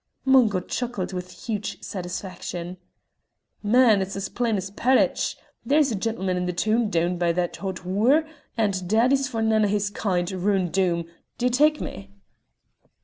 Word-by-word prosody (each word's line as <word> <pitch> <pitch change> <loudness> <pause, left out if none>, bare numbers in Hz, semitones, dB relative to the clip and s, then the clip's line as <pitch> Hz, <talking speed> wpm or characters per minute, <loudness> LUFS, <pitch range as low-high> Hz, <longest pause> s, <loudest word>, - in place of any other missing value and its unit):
Mungo 245 -8 +4
chuckled 235 -2 -4
with 180 0 -7
huge 205 -3 -3
satisfaction. 180 -1 -6 0.8
"Man, 220 -1 +4
it's 190 +1 -4
as 195 -1 -4
plain's 210 -6 -1
parridge! 255 +5 +1 0.3
There's 290 -1 +3
a - - -1
gentleman 195 -3 -1
in 180 0 -1
the 180 - -1
toon 220 +5 +1
down 175 -1 0
by 175 -1 +2
that's 175 0 -2
a - - -17
hot 190 -2 -5
wooer, 235 - +3 0.3
and 195 -5 0
daddy's 255 +5 +3
for 225 -5 -2
nane 220 -1 +3
o' - - +3
his 205 0 0
kind 185 -3 -1
roon' 190 -1 0
Doom; 175 -2 0 0.3
d'ye 250 0 +1
tak' 300 +5 +3
me?" 100 0 -7
200 Hz, 155 wpm, -24 LUFS, 180-230 Hz, 0.8 s, Mungo